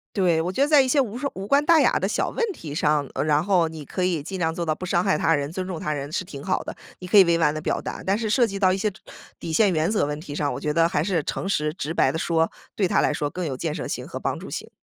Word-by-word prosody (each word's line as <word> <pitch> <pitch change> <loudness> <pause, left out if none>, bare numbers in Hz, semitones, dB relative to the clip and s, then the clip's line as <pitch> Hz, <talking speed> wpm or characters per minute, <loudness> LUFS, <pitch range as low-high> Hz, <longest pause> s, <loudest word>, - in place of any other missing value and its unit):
对， 175 -5 +2
我 175 +3 -2
觉 230 - -2
得 285 - +4
在 295 -2 +6
一 265 - 0
些 280 +2 +3
无 235 -3 -1
伤 280 +2 -3
无 195 +1 -6
关 280 +4 +3
大 330 0 +6
雅 - - +3
的 - - -1
小 - - 0
问 - - -2
题 155 - -8
上， 150 -2 +1
呃， - - -1
然 150 -1 +2
后 175 -5 +3
你 155 -3 -9
可 185 - -3
以 175 -5 0
尽 190 +6 -6
量 165 -2 0
做 170 +1 -3
到 155 -1 0
不 185 - -7
伤 175 -1 +1
害 190 -4 +1
他 165 - +2
人， 145 -1 -1
尊 185 +1 -3
重 180 -3 -5
他 150 - -2
人 145 0 -5
是 185 - -2
挺 140 -5 -9
好 185 - 0
的， - - -7 0.2
你 180 - -8
可 210 - +4
以 195 - +10
委 170 -1 +2
婉 150 -3 +2
地 155 - -4
表 - - -1
达。 - - -6
但 195 +2 +2
是 220 -1 -2
涉 240 +2 +4
及 200 -2 -5
到 185 -2 +4
一 - - -1
些 210 +1 0 0.5
底 165 - -5
线 200 +3 +4
原 160 +2 +1
则 210 -6 +1
问 150 +1 -4
题 150 -3 -8
上， 145 -1 -1
我 - - -5
觉 150 0 -2
得 165 +1 +4
还 150 - 0
是 170 -2 0
诚 195 - -3
实 150 -5 0
直 160 -3 -4
白 - - +3
地 - - -3
说， 165 -1 +1 0.2
对 190 -4 +1
他 - - +3
来 - - +2
说 145 -1 -2
更 180 +3 -4
有 135 - -3
建 150 +3 -3
设 - - -4
性 - - -4
和 - - -7
帮 - - -2
助 - - -9
性。 - - -6
170 Hz, 350 characters per minute, -24 LUFS, 155-195 Hz, 0.5 s, 以